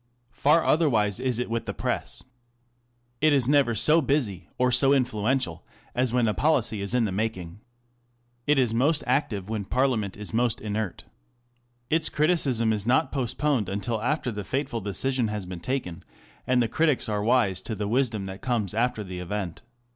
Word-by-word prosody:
Far 150 +7 +3
otherwise 115 - +2
is 125 -3 -1
it 125 - -2
with 115 0 -3
the - - -4
Press. - - -2 1.0
It 155 -1 +5
js 135 -4 +3
never 140 -5 +3
so 155 +9 +4
busy 115 - -1
or 125 0 +2
so 135 +2 +4
influential 120 -7 0 0.3
as 125 -1 +1
when 120 -2 +2
a 105 - +1
policy 115 -2 +1
is 100 +4 -1
in 120 -2 +3
the 105 - -2
making. 95 -3 -3 0.9
It 150 0 +4
is 125 -4 +2
most 145 +7 +2
active 120 -7 0
when 110 -1 -3
Parliament 115 -3 0
is 105 +1 -5
most 120 0 +1
inert. 105 -3 -4 0.9
Its 160 0 +4
criticism 140 -8 +1
is 105 0 -3
not 130 +6 +2
postponed 130 -3 0
until 105 +3 -2
after 125 +1 -1
the 105 -1 -5
fateful 130 +1 -2
decision 120 +5 0
has 105 -2 -4
been 90 -1 -7
taken, 90 -5 -3 0.5
and 125 -1 +3
the - - 0
critics 150 +3 +1
are 105 -1 -1
wise 110 -5 +2
with 110 - -3
the 105 0 -2
wisdom 115 -3 0
that 95 0 -8
comes 120 -7 -1
after 115 0 0
the 90 -2 -7
event. 90 -1 -4
115 Hz, 175 wpm, -26 LUFS, 105-135 Hz, 1.0 s, It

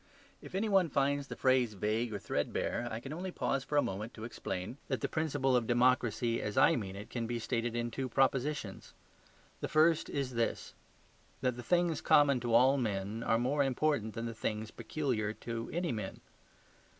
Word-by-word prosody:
If - - -9
any 205 +3 +1
one 190 -5 +3
finds 140 0 +1
the - - -6
phrase 130 -4 +2
vague 110 +4 -1
or 105 - -2
threadbare, 120 +3 -2
I 110 - -4
can 135 +4 -7
only 180 +4 -4
pause 135 -6 -1
for 150 - -1
a 145 - +5
moment 105 +5 -4
to 110 - -8
explain 115 +1 -5
that - - -2
the - - 0
principle 145 -4 +1
of 120 -2 +1
democracy, 120 -1 +2
as 105 - -4
I - - +6
mean 95 -5 -4
it, 105 +2 -9
can 115 -2 -2
be 120 0 -2
stated 115 0 -2
in 120 0 -1
two 130 +2 -3
propositions. 135 -4 0 0.6
The - - -3
first 155 +1 +3
is 135 -2 -2
this: 115 -1 -1 0.7
that 125 -1 +1
the 120 - -6
things 175 +3 +1
common 140 -3 +5
to 120 -1 0
all 130 +4 +6
men 105 -2 -2
are 115 -1 +2
more 130 +5 +1
important 135 -5 0
than 115 0 -3
the 115 - -4
things 110 0 -3
peculiar 120 -8 -2
to 115 0 -5
any 175 0 -1
men. 105 -4 -5
120 Hz, 190 wpm, -33 LUFS, 115-140 Hz, 0.7 s, I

